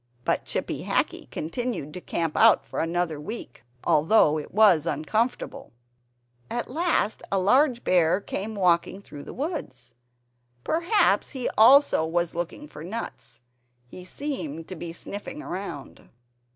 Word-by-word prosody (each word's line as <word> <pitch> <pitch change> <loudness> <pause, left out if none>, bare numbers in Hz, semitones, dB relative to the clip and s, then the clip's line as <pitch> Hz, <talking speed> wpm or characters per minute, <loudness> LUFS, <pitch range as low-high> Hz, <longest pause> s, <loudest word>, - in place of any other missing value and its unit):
But - - 0
Chippy - - -3
Hackee - - -1
continued 170 - -4
to 180 - -7
camp 165 -3 -2
out 225 -1 +5
for - - -5
another 165 -2 -1
week, 215 - -7 0.2
although 155 -1 +4
it 150 - -9
was 185 -6 +5
uncomfortable. 220 - -2 0.8
At 240 - -3
last 320 - 0
a 195 - +2
large 245 +6 +3
bear 175 0 +3
came 205 +2 -5
walking 180 -1 +2
through 145 -6 -10
the - - -9
wood. 290 - -4 0.9
Perhaps 345 +7 +2
he 260 -3 -3
also 255 - +6
was 170 +1 -1
looking 175 - -5
for 150 - -10
nuts; 175 - -7 0.4
he 180 +9 -11
seemed 180 - -5
to 185 - -5
be 170 0 -6
sniffing 205 - -7
around. 180 -7 -7
185 Hz, 135 wpm, -26 LUFS, 165-240 Hz, 0.9 s, also